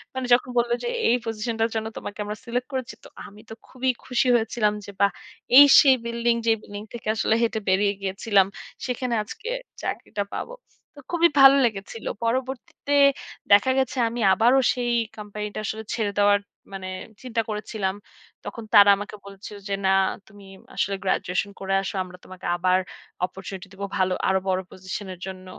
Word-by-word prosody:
মানে 260 -1 -2
যখন 250 +1 +3
বলল 235 0 0
যে - - -2 0.2
এই 235 - +5
পজিশন 225 +1 -3
টার 225 +1 +2
জন্য 220 0 -2
তোমাকে 205 - -7
আমরা 210 +1 -5
সিলেক্ট 245 +1 -2
করেছি। 260 -1 -3
তো - - -12 0.2
আমি 210 +1 -15
তো - - -7
খুবই 260 0 -2 0.2
খুশি 250 0 +1
হয়েছিলাম। 220 -2 +1
যে - - -8
বাহ! 200 0 +5 0.5
এই 285 - +12 0.2
সেই 270 -2 +6
বিল্ডিং 235 0 +1
যেই 225 -1 +4
বিল্ডিং 205 0 -8
থেকে 235 - -8
আসলে 220 - +1
হেঁটে 225 -1 0
বেরিয়ে 200 +2 +3
গিয়েছিলাম। 195 +1 +2 0.4
সেখানে 250 -1 -2
আজকে 405 - -9 0.4
চাকরিটা 205 - -3
পাবো। - - -5 0.4
তো - - -12
খুবই 340 -1 +4
ভালো 270 0 +9
লেগেছিল। 220 0 -4 0.2
পরবর্তীতে 260 +3 -3 0.6
দেখা 205 +6 +6
গেছে 265 0 -1
আমি 235 +1 -5
আবারো 240 +6 +4 0.2
সেই 245 -1 -1 0.3
কোম্পানি 210 0 -6
টা - - -3
আসলে 220 +1 -4
ছেড়ে 210 -3 -1
দেওয়ার 205 0 +5 0.3
মানে 190 -1 -6 0.4
চিন্তা 235 -2 -1
করেছিলাম। 210 -2 -3 0.5
তখন 230 - -7
তারা 205 0 +9
আমাকে 205 +1 -7
বলেছিল 200 +1 -10
যে 200 - -1
না - - +4 0.4
তুমি 205 -2 -15 0.3
আসলে 200 0 0
গ্র্যাজুয়েশন 190 +1 -1
করে 195 0 -2
আসো। 195 +1 -5
আমরা 180 0 -12
তোমাকে 185 -1 -11
আবার 185 +1 +3 0.5
অপরচুনিটি 190 0 -9
দিবো 200 +1 -5
ভালো 185 -1 +2 0.2
আরো 190 0 +3
বড় 185 0 +1
পজিশন 190 +2 -7
এর 180 - -14
জন্য। 185 -1 -8
210 Hz, 175 wpm, -24 LUFS, 195-240 Hz, 0.6 s, এই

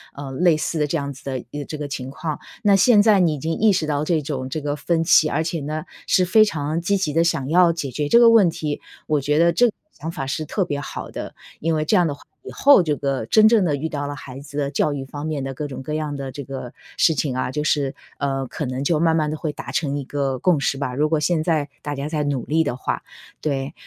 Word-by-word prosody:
呃， 140 -1 -7
类 165 +3 +3
似 155 +1 -2
的 150 - +1
这 165 - -1
样 140 -1 -4
子 130 - -15
的 135 -1 -3
一 145 - -5
个 145 - -5
这 155 - -6
个 145 -1 -4
情 130 -2 -5
况。 155 +2 -4 0.2
那 205 -2 +5
现 205 +3 +5
在 215 -3 +5
你 165 -4 +3
已 - - -6
经 160 +4 -2
意 215 -1 +4
识 180 -4 0
到 150 -1 -1
这 160 0 +1
种 135 -3 -4
这 155 - -3
个 145 0 -2
分 165 +3 0
歧， 155 -2 +5
而 155 +3 0
且 165 0 -2
呢 155 +2 -4 0.2
是 185 - +3
非 215 +5 +6
常 155 -3 -2
积 200 +3 +1
极 165 -6 -1
地 165 +2 +3
想 140 -6 0
要 175 0 +5
解 150 -5 -4
决 145 +3 -2
这 - - +6
个 235 -1 +7
问 205 -7 +6
题， 150 -2 -4 0.2
我 150 -2 +1
觉 150 +2 +1
得 170 +1 +4
这 245 - +4
个 220 - -3 0.2
想 160 - -7
法 135 -4 -4
是 140 +4 -2
特 185 +5 -1
别 145 -3 -3
好 - - -7
的， - - -7 0.2
因 165 +1 0
为 155 0 0
这 210 - +2
样 175 -3 +4
的 145 - -3
话 - - -19 0.2
以 - - -8
后 280 -8 +6
这 155 -3 0
个 135 -3 -2
真 215 0 +6
正 220 -3 +4
地 150 - +1
遇 150 +3 -3
到 145 -2 -4
了 145 - -5
孩 130 -1 -9
子 145 +1 -10
的 140 -1 -1
教 145 +1 +1
育 135 -1 -5
方 145 +3 -6
面 145 -4 -2
的 135 - -4
各 145 +3 -4
种 135 -1 -7
各 150 - -5
样 155 -2 -2
的 135 -1 -5
这 140 +2 -7
个 130 -2 -7 0.2
事 165 - +4
情 140 -2 -1
啊， 125 0 -1
就 150 +3 -2
是， 140 -3 +1 0.2
呃， 135 -2 -2
可 150 - -4
能 130 +2 -3
就 155 +1 +1
慢 165 -1 +3
慢 155 -2 +1
地 155 - -3
会 155 - -3
达 - - -7
成 145 -4 -1
一 - - -4
个 135 -2 -2
共 175 -2 +3
识 140 - 0
吧， 130 -3 -3
如 150 +3 +2
果 155 0 +1
现 155 +1 +1
在 155 -4 0
大 145 - -3
家 140 +1 -4
在 155 -2 -1
努 140 -4 -1
力 160 +2 +2
的 145 -5 -2
话， 130 - -3 0.4
对。 140 -2 -2
150 Hz, 305 characters per minute, -22 LUFS, 140-165 Hz, 0.4 s, 个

